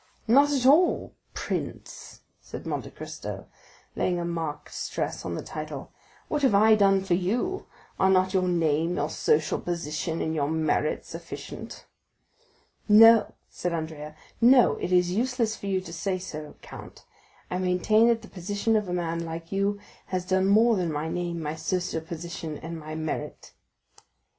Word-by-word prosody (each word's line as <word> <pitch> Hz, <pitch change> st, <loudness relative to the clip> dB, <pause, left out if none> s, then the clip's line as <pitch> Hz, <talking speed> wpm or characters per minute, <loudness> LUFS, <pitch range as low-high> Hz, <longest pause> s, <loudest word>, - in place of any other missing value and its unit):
Not 280 Hz, +6 st, +5 dB
at 265 Hz, -3 st, 0 dB
all, 310 Hz, +7 st, +4 dB, 0.2 s
prince," -, -, -5 dB, 0.2 s
said -, -, -9 dB
Monte -, -, -3 dB
Cristo -, -, -7 dB, 0.5 s
laying 175 Hz, -1 st, 0 dB
a 170 Hz, -, -2 dB
marked 165 Hz, -3 st, -4 dB
stress -, -, -3 dB
on 85 Hz, -, -3 dB
the -, -, -5 dB
title, 155 Hz, -3 st, -7 dB, 0.4 s
"what 300 Hz, -, -1 dB
have 265 Hz, -7 st, +4 dB
I 220 Hz, +2 st, +6 dB
done 195 Hz, -2 st, +4 dB
for 190 Hz, -, 0 dB
you? 230 Hz, -, -1 dB, 0.3 s
Are 190 Hz, -, +4 dB
not 185 Hz, 0 st, +3 dB
your 185 Hz, -1 st, +2 dB
name, 165 Hz, -1 st, +1 dB
your 150 Hz, +2 st, -1 dB
social 150 Hz, 0 st, +1 dB
position, 165 Hz, -1 st, -3 dB
and 160 Hz, -, -1 dB
your 145 Hz, -2 st, 0 dB
merit 155 Hz, -1 st, 0 dB
sufficient?" -, -, -8 dB, 1.0 s
"No," 225 Hz, +1 st, +7 dB
said 175 Hz, -1 st, -4 dB
Andrea,—"no; 160 Hz, -, +2 dB
it -, -, -4 dB
is 180 Hz, -1 st, +3 dB
useless 230 Hz, +1 st, 0 dB
for 200 Hz, -, -8 dB
you 190 Hz, -1 st, +1 dB
to 170 Hz, -2 st, -10 dB
say 185 Hz, +2 st, -1 dB
so, 155 Hz, -5 st, -8 dB
count. -, -, -11 dB, 0.5 s
I 180 Hz, -, -1 dB
maintain 185 Hz, +5 st, +3 dB
that 230 Hz, -1 st, +2 dB
the -, -, -10 dB
position 205 Hz, +5 st, -1 dB
of 210 Hz, -3 st, 0 dB
a -, -, -2 dB
man 170 Hz, -1 st, -2 dB
like 165 Hz, 0 st, -7 dB
you 200 Hz, +1 st, 0 dB, 0.3 s
has 185 Hz, -1 st, -2 dB
done 190 Hz, 0 st, +2 dB
more 220 Hz, +2 st, +5 dB
than 175 Hz, -3 st, -1 dB
my 150 Hz, +2 st, -3 dB
name, 175 Hz, 0 st, -3 dB
my 150 Hz, 0 st, -2 dB
social 165 Hz, +1 st, -2 dB
position, 165 Hz, -1 st, -6 dB
and 165 Hz, 0 st, -7 dB
my 155 Hz, 0 st, -7 dB
merit." 155 Hz, -1 st, -5 dB
180 Hz, 160 wpm, -26 LUFS, 160-205 Hz, 1.0 s, No